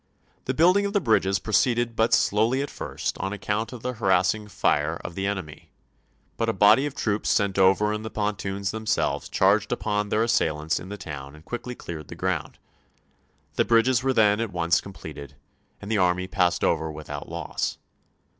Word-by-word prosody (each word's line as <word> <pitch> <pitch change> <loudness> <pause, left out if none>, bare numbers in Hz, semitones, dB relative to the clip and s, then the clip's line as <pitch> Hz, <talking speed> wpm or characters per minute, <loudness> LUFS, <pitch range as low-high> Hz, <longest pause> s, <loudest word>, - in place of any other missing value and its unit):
The 130 - -1
building 180 +6 +4
of 200 - -6
the 205 - +3
bridges 105 - +2
proceeded 115 +4 +1
but 110 +1 +2
slowly 115 +6 +2
at 145 - -6
first - - -4
on 95 +1 -2
account 105 +2 -2
of 125 -3 -9
the 125 0 -2
harassing 105 0 +1
fire 80 -5 +1
of - - -5
the 95 +2 -2
enemy, 95 -7 -5 0.7
but 115 0 0
a - - +1
body 105 +8 +5
of 140 - -8
troops 105 -5 -1
sent 100 -1 +1
over 95 +3 +4
in 105 - -3
the 110 - -5
pon 105 -1 -1
toons 100 0 -3
themselves 110 0 -1
charged 100 +2 +2
upon 105 0 -1
their 110 +2 +2
assailants 80 -8 0
in 95 - -10
the 105 - -6
town 70 -5 -8
and 75 +2 -16
quickly 125 +3 -5
cleared 80 -8 -8
the - - -9
gi'ound. - - -2 1.0
The - - +3
bridges 120 +2 +3
were 135 +1 +1
then 105 -4 +4
at 115 -3 -2
once 85 -1 +1
completed, 75 -7 -10 0.4
and 100 +1 -7
the 110 - +2
army 90 0 +2
passed 90 -2 +1
over 80 -1 +1
without 75 0 -7
loss. - - -3
105 Hz, 185 wpm, -25 LUFS, 90-115 Hz, 1.0 s, body